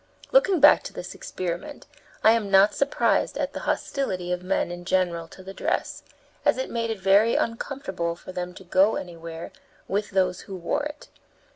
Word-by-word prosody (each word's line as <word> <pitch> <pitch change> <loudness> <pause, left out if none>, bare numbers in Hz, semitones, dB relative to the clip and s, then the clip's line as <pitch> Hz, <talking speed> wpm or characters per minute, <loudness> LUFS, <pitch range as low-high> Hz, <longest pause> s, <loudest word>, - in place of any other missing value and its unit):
Looking 395 -8 +4
back 295 +1 +7
to - - -7
this - - -7
experiment, 180 - -5 0.4
I 220 - +8
am 225 -3 +1
not 195 +1 +6
surprised 280 0 +1
at - - -2
the - - -4
hostility 185 -10 -2
of 180 0 -1
men 180 -1 -1
in 175 0 -7
general 175 -2 0
to 185 - -13
the 190 +1 -8
dress, - - -2 0.4
as - - +3
it - - -3
made 230 -1 -1
it 225 - -2
very 200 +4 +4
uncomfortable 210 -8 -2
for 175 - -10
them 180 0 -5
to - - -11
go 190 +4 +3
anywhere 165 -2 -7 0.4
with 205 +2 -1
those 185 -2 +1
who 195 - -8
wore 175 +8 -1
it. 295 0 -8
190 Hz, 180 wpm, -25 LUFS, 180-230 Hz, 0.4 s, I